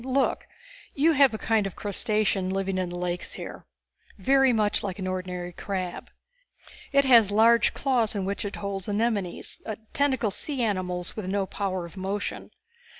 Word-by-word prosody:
Look. 265 +1 0 0.5
You 305 +4 +4
have 280 -3 +5
a 220 - -4
kind 215 -2 +1
of 195 - -8
crustacean 205 -2 0
living 195 0 -1
in 180 -1 -1
the 175 - -6
lakes 175 0 -3
here, - - -8 0.5
very 270 -1 +4
much 215 -3 +1
like 190 -3 -4
an 190 - -4
ordinary 180 -1 -4
crab. 185 -1 -4 0.8
It 280 -1 +4
has 235 -6 +7
large 225 +3 +4
claws 245 -6 +1
in 195 -2 -1
which 200 +3 -2
it 205 - -4
holds 200 -1 -4
anemones, 205 -4 -2 0.3
tentacled 260 -7 +1
sea 275 0 -2
animals 180 -4 -1
with 215 -4 -5
no 195 +1 0
power 190 -2 -3
of 170 +3 -12
motion. 195 +2 -3
205 Hz, 160 wpm, -26 LUFS, 185-235 Hz, 0.8 s, has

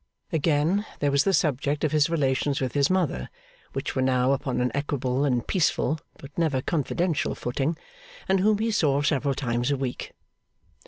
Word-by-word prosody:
Again, 160 +5 +2
there 145 -1 +1
was 140 +2 +3
the 195 - +3
subject 145 -4 +1
of 155 - +1
his 155 0 +3
relations 140 -3 +1
with 130 -2 -2
his 140 -1 +2
mother, 175 - 0 0.4
which - - -3
were 130 - +1
now 130 0 +2
upon 135 -2 -1
an 125 0 +1
equable 140 -2 -1
and 125 -4 0
peaceful 160 -3 +1 0.2
but 140 +1 -12
never 155 -6 +1
confidential 165 +3 -1
footing, 135 +6 -2 0.5
and 190 0 +3
whom 210 +2 +3
he 225 +2 0
saw 145 -8 +2
several 140 -2 +1
times 120 -2 -1
a 140 - +1
week. 130 -2 -4
145 Hz, 170 wpm, -26 LUFS, 130-160 Hz, 0.5 s, was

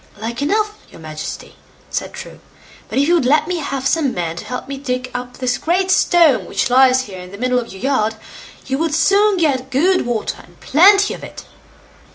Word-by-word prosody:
"Like 230 +3 -5
enough, 420 +7 0
your - - -15
Majesty", 155 -1 -8 0.3
said - - -3
True; - - -10 0.5
"but - - -4
if 285 +2 +3
you 345 - +3
would 335 -7 +2
let 305 +3 +3
me 360 0 -2
have 275 -4 -4
some 285 -2 +1
men 170 -2 -3
to - - -7
help 250 +1 -6
me 275 0 -6
to - - -17
dig 255 -1 -3
up 245 0 -5
this 250 -1 -1
great 370 +3 0
stone 340 -6 +4
which - - -1
lies 260 0 +5
here 195 -6 -9
in 180 0 -10
the 200 - -9
middle 250 +2 +1
of 235 - -7
your 190 +4 -11
yard, 225 -5 +1 0.5
you 265 +1 -2
would 320 -2 0
soon 395 +6 +3
see 305 -5 +3
good 320 +3 +2
water, 230 -3 -2
and - - -21
plenty 395 +7 +4
of - - -10
it." - - -10
270 Hz, 210 wpm, -18 LUFS, 245-330 Hz, 0.5 s, lies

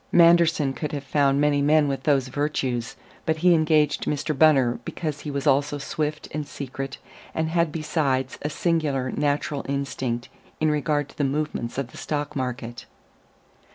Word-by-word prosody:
Manderson 170 -4 +5
could 150 +2 -4
have 140 -2 -3
found 140 0 +2
many 145 -1 +3
men 150 +1 +4
with 135 -1 -2
those 135 -3 +2
virtues: 130 -4 -2 0.3
but 160 0 +2
he 180 - +7
engaged 155 -2 +2
Mr. 150 +1 -1
Bunner 135 -5 +4
because 155 -4 -4
he 150 - -6
was 140 0 -3
also 145 +1 +2
swift 150 +2 -3
and 150 -1 -4
secret, 135 -1 -6 0.4
and 160 0 0
had 170 -1 +1
besides 145 -4 -1
a 150 - -2
singular 150 -6 0
natural 145 0 -1
instinct 130 -3 -2 0.3
in 155 -1 +2
regard 145 0 0
to - - -18
the - - +2
movements 140 -4 -2
of 135 -2 -3
the - - -12
stock 145 -1 -3
market. 120 -3 -4
145 Hz, 160 wpm, -25 LUFS, 135-155 Hz, 0.4 s, he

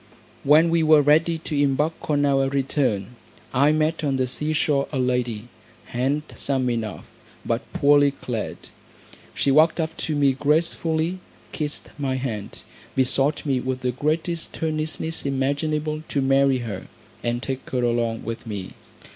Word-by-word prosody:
When 155 +4 +5
we 170 0 +3
were 155 -2 +6
ready 160 +3 +3
to 160 -1 -5
embark 145 +4 0
on 145 -1 +3
our 135 -1 +2
return, 130 -5 -1 0.4
I 140 +3 +4
met 155 +1 0
on 140 -2 +1
the 130 -1 +1
sea 150 +5 -2
shore 145 -3 +1
a 140 - -2
lady, 125 -3 -1 0.4
handsome 135 0 -1
enough, 110 -4 -4 0.4
but - - -2
poorly 145 0 +5
clad. 125 -5 -4 0.8
She 140 - +2
walked 155 +4 +4
up 160 0 -2
to 155 - -2
me 140 -2 +3
gracefully, 160 +4 0 0.3
kissed 150 -2 -4
my 135 -2 -1
hand, 115 -6 -5 0.3
besought 135 +3 +1
me 135 -3 +1
with 130 0 -3
the 125 -1 0
greatest 160 +5 -2
earnestness 160 +1 -2
imaginable 150 +3 -1
to 140 - -1
marry 135 0 +3
her, 100 -4 -6 0.3
and 120 +1 -2
take 135 -1 -4
her 125 -1 -1
along 115 -1 0
with 115 +1 -6
me. 100 -4 -5
140 Hz, 145 wpm, -23 LUFS, 125-155 Hz, 0.8 s, were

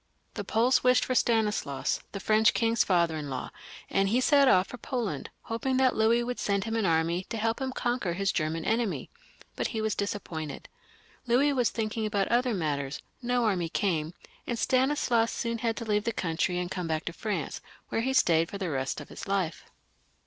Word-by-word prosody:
The 205 - -4
Poles 230 +6 +2
wished 250 0 +4
for 255 - -1
Stanislaus, 215 - +1
the 200 - -5
French 215 +2 +3
king's 230 -3 +2
father 170 -3 +2
in 150 -2 -5
law, 130 -1 -4 0.4
and 195 0 +1
he 235 +5 +3
set 280 +1 +5
off 185 -7 +5
for 245 - -8
Poland, 240 -6 -3
hoping 255 +3 -1
that 260 -1 +3
Louis 230 +2 +3
would 245 +1 -4
send 200 -1 0
him 225 +1 -3
an 220 -4 +1
army 165 +2 +1
to 230 - -5
help 225 +3 -1
him 265 -1 -1
conquer 240 -8 -1
his 195 +2 0
German 160 +1 -2
enemy, 225 -1 -1 0.4
but. - - -1
he 225 - -4
was 220 -1 0
disappointed. 165 -8 -4 0.6
Louis 270 +5 +3
was 250 -3 +2
thinking 220 -1 -2
about 200 -2 0
other 245 -1 +2
matters; 145 -5 -2 0.2
no 245 -1 +1
army 180 -6 0
came, 165 -4 -1 0.3
and 240 - -1
Stanis 265 +4 +1
laus 230 -1 +3
soon 230 -1 -2
had 230 0 -1
to 230 - -4
leave 210 -1 0
the 230 - +1
country 180 -2 -1
and 180 0 -3
come 180 -3 -3
back 160 -1 -2
to 170 - -3
France, 195 -5 -3 0.3
where 225 - 0
he 260 +3 0
stayed 165 -8 +3
for 200 - -5
the 185 -4 -3
rest 135 -1 -2
of - - -11
his - - -8
life. 190 -5 -1
215 Hz, 200 wpm, -28 LUFS, 175-235 Hz, 0.6 s, set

